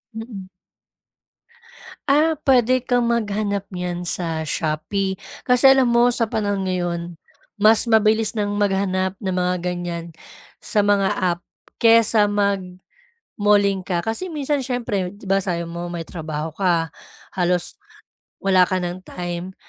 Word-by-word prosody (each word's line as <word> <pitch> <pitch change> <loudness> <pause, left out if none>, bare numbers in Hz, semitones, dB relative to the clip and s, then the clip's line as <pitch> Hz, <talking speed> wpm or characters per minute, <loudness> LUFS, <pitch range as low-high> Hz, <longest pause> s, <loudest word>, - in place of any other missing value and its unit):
Mm. 220 -4 -7 1.6
Ah, 310 +3 +3
puwede 255 -1 +3
kang 245 -1 +1
maghanap 205 -3 -1
niyan 180 -1 -4
sa 165 -2 -2
Shopee. 165 +6 -2 0.3
Kasi 250 +2 +6
alam 265 -2 +4
mo 240 +1 +4
sa 235 -1 0
panahon 205 -3 -1
ngayon, 175 -1 -3 0.4
mas 215 +2 +4
mabilis 220 0 +3
ng 205 -1 -1
maghanap 190 -1 0
ng 190 - -1
mga 180 0 0
ganyan 175 -1 -3 0.5
sa 210 -4 0
mga 200 -1 +2
app, 175 -2 0 0.4
kaysa 225 -2 +5
mag-malling 200 - -2 0.9
ka. 175 0 -3
Kasi 345 +12 -2
minsan 290 -2 -1
siyempre 230 -8 -2
'di 205 +1 -14
ba 195 0 +2
sabi 170 -3 -2
mo 170 +1 -6
may 170 -2 -5
trabaho 155 -2 -5
ka, 170 -3 0 0.4
halos 180 -1 0 0.6
wala 185 -2 +4
ka 185 - 0
ng 175 +1 -4
time 175 +1 -5
195 Hz, 130 wpm, -21 LUFS, 175-225 Hz, 1.6 s, Kasi